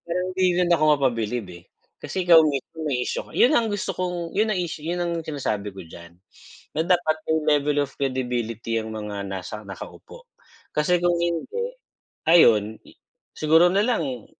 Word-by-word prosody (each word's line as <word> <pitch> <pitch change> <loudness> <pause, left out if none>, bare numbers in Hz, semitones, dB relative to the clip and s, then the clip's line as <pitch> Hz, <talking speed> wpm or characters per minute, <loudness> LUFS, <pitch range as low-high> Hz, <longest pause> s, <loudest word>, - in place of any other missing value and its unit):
parang 180 +2 -2
hindi 185 - +2
rin 175 -1 +2
ako 155 -2 +2 0.2
mapabilib, 115 -4 -1
eh, 85 -1 -12 0.4
kasi 185 -2 -3
ikaw 165 -2 +8
mismo 155 +2 -3
may 135 -5 -1
issue - - -3
ka - - -17
yun 255 - +4
ang 225 -3 +1
gusto 205 - -3
kong 180 -1 -4
yun 215 +1 +2
ang 185 - -1
issue 160 -3 -5
yun 175 +2 -2
ang 175 -1 -1
sinasabi 105 -9 -3
ko 95 - -10
diyan, 85 +1 -12 0.6
na 160 - +1
dapat 175 -3 +2
may 155 -2 +3
level 145 0 0
of 140 - -12
credibility 120 -4 -2
ang 110 0 -7
mga 105 -2 -5
nasa 95 +2 -6
nakaupo. 295 - -11 0.5
Kasi 175 +4 +2
kung 175 0 +2
hindi, 170 - -2 0.6
ayun 110 -10 +5 0.6
siguro 160 +3 +5
na 200 - +3
lang 140 - -2
155 Hz, 170 wpm, -24 LUFS, 115-175 Hz, 0.6 s, ikaw